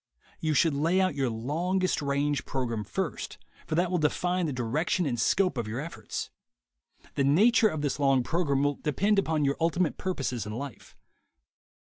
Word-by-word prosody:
You 155 -1 0
should 160 +3 +4
lay 165 +6 +2
out 185 -3 +2
your 135 -3 0
longest 165 +12 -1
range 140 0 0
program 120 -5 -2
first, 100 0 -4 0.3
for - - -1
that 175 +1 +1
will 180 - +1
define 175 +3 0
the - - -2
direction 140 +8 0
and 120 -5 -1
scope 180 +3 +2
of 115 - -3
your 110 +4 -3
efforts. 165 +4 -5 0.8
The 140 - +1
nature 220 - +5
of 155 -5 -4
this 145 -1 -1
long 135 -3 +3
program 140 -3 0
will 145 -1 0
depend 200 +7 +2
upon 160 -6 +1
your 140 0 +1
ultimate 170 +1 0
purposes 135 - -2
in 105 - -5
life. 135 +1 -8
150 Hz, 170 wpm, -28 LUFS, 135-175 Hz, 0.8 s, nature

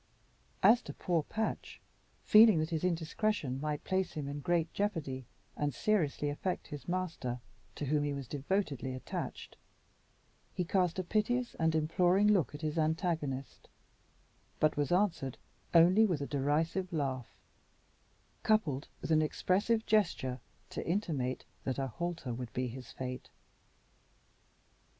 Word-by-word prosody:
As 235 +2 +7
to - - -8
poor 175 -3 +1
Patch, 220 +8 -3 0.4
feeling 215 -3 +8
that 155 +2 -1
his 160 0 -1
indiscretion 165 - 0
might 150 -1 -2
place 190 -1 0
him 150 -2 -4
in 145 +1 -4
great 170 +1 0
jeopardy 150 - -2 0.3
and 145 -3 -1
seriously 160 -8 +1
affect 180 +5 -3
his 145 -1 -8
master, 170 -9 -2 0.4
to 150 - -3
whom 145 +1 +1
he 145 - 0
was 140 -3 -5
devotedly 140 - -2
attached, 130 - -6 1.0
he 180 - 0
cast 180 -1 +1
a 185 - 0
piteous 235 +6 0
and 160 -1 +2
imploring 175 +5 +3
look 185 -8 +2
at 145 - -8
his 155 +1 -1
antagonist, 155 -4 -1 0.9
but 155 0 +3
was 145 +2 0
answered 175 - +1 0.3
only 180 +6 +6
by 180 - +1
a 140 - -2
derisive 155 +7 0
laugh, 135 -6 -3 1.0
coupled 155 -11 +1
with - - -4
an 155 0 +5
expressive 205 +8 +1
gesture 165 - +1 0.3
to - - -4
intimate 155 -9 -1 0.2
that 130 - -2
a 135 - 0
halter 165 0 -4
would 120 0 -6
be 125 0 -1
his 125 +1 -8
fate. 125 -1 -6
160 Hz, 135 wpm, -33 LUFS, 140-185 Hz, 1.0 s, feeling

